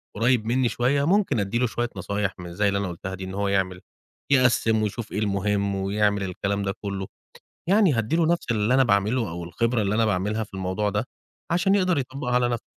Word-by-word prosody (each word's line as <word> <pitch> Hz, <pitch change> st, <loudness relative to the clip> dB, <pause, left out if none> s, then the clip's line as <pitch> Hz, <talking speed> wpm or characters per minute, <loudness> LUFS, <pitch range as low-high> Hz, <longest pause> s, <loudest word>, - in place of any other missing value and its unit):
قريّب 115 Hz, +1 st, +2 dB
مني 125 Hz, +1 st, +1 dB
شوية، 135 Hz, +4 st, +1 dB
ممكن 190 Hz, -, +2 dB
أدي 100 Hz, +3 st, -1 dB
له 125 Hz, -, +2 dB
شوية 120 Hz, +1 st, -2 dB
نصايح 100 Hz, +1 st, -2 dB
من 85 Hz, -1 st, -8 dB
زي 100 Hz, +3 st, +1 dB
اللي 100 Hz, 0 st, +1 dB
أنا 100 Hz, -, -2 dB
قُلتها 95 Hz, +2 st, -6 dB
دي 95 Hz, -, -8 dB
إن 95 Hz, 0 st, -6 dB
هو 100 Hz, 0 st, -1 dB
يعمل 95 Hz, -2 st, 0 dB, 0.5 s
يقسّم 115 Hz, -4 st, +3 dB
ويشوف 105 Hz, +1 st, -4 dB
إيه 105 Hz, -, -2 dB
المهم 100 Hz, -1 st, 0 dB
ويعمل 100 Hz, +1 st, +1 dB
الكلام 100 Hz, +2 st, -2 dB
ده 95 Hz, 0 st, -1 dB
كلّه 100 Hz, -2 st, -4 dB, 0.6 s
يعني، 200 Hz, -3 st, +5 dB
هأدي 115 Hz, +8 st, 0 dB
له 165 Hz, -1 st, +3 dB
نفس 170 Hz, -5 st, 0 dB
اللي 110 Hz, +2 st, +2 dB
أنا 135 Hz, 0 st, +5 dB
باعمله 110 Hz, 0 st, +1 dB
أو 85 Hz, +1 st, -5 dB
الخبرة 115 Hz, +6 st, 0 dB
اللي 100 Hz, +1 st, 0 dB
أنا 115 Hz, -, +3 dB
باعملها 105 Hz, +3 st, 0 dB
في 100 Hz, -, -17 dB
الموضوع 95 Hz, +2 st, -1 dB
ده، 105 Hz, +2 st, -1 dB, 0.5 s
عشان 180 Hz, +3 st, +2 dB
يقدر 185 Hz, -5 st, +2 dB
يطبقها 130 Hz, -1 st, -3 dB
على 125 Hz, 0 st, +3 dB
نفسه. 120 Hz, -2 st, -2 dB
105 Hz, 210 wpm, -24 LUFS, 100-125 Hz, 0.6 s, يعني